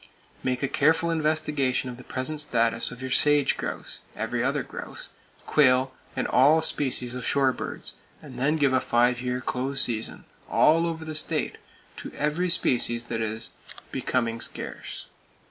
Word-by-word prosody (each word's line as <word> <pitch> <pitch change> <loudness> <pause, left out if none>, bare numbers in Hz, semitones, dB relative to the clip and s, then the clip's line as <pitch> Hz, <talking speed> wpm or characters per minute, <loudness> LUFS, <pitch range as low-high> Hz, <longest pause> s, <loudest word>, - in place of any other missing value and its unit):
Make 125 0 -1
a - - +2
careful 160 +5 +2
investigation 150 -5 0
of 125 -1 -7
the 125 - -11
present 140 +5 -3
status 115 -5 0
of 125 +1 -10
your 130 - -4
sage 145 0 +5
grouse, - - -5 0.2
every - - -2
other - - 0
grouse, - - -7 0.4
quail, 130 -2 +3 0.2
and - - -1
all 145 +5 +5
species 130 -5 0
of 125 -1 -5
shore 135 0 +2
birds, - - -4 0.3
then 140 +2 -1
give 140 -4 +2
a 130 - +3
five 120 +1 +2
year 125 0 -2
close 130 +2 0
season, 115 -2 -1 0.2
all 165 +2 +4
over 160 -1 -4
the 155 - -5
state, 155 - 0 0.4
to - - -7
every 150 +5 0
species 120 -7 +3
that 115 - -1
is 110 0 -3 0.4
"becoming 115 -2 -1
scarce." - - -6
130 Hz, 155 wpm, -26 LUFS, 125-150 Hz, 0.4 s, sage